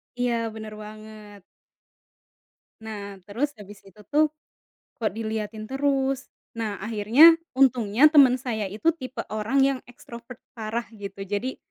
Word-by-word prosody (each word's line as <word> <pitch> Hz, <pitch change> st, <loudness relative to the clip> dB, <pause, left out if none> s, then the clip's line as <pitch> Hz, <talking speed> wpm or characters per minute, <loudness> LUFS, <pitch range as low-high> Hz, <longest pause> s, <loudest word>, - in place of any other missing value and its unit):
Iya, 245 Hz, -1 st, 0 dB, 0.2 s
benar 215 Hz, -1 st, -8 dB
banget. 215 Hz, -1 st, -12 dB, 1.4 s
Nah 205 Hz, -2 st, -7 dB
terus 245 Hz, +10 st, -2 dB
habis 205 Hz, -1 st, -12 dB
itu 210 Hz, +2 st, -16 dB
tuh, 305 Hz, +1 st, +4 dB, 0.7 s
kok 215 Hz, -3 st, 0 dB
diliatin 220 Hz, 0 st, -4 dB
terus. 270 Hz, 0 st, -1 dB, 0.3 s
Nah 215 Hz, -3 st, -3 dB
akhirnya, 230 Hz, +10 st, +6 dB, 0.2 s
untungnya 250 Hz, 0 st, +5 dB
teman 280 Hz, -5 st, +6 dB
saya 220 Hz, -6 st, -3 dB
itu 260 Hz, -, +1 dB
tipe 260 Hz, -4 st, -8 dB
orang 215 Hz, +6 st, -1 dB
yang 270 Hz, -1 st, +1 dB
ekstrovert 235 Hz, 0 st, -12 dB, 0.2 s
parah 225 Hz, +1 st, -3 dB
gitu. 200 Hz, -1 st, -8 dB
Jadi, 205 Hz, +6 st, -3 dB
220 Hz, 125 wpm, -25 LUFS, 210-260 Hz, 1.4 s, akhirnya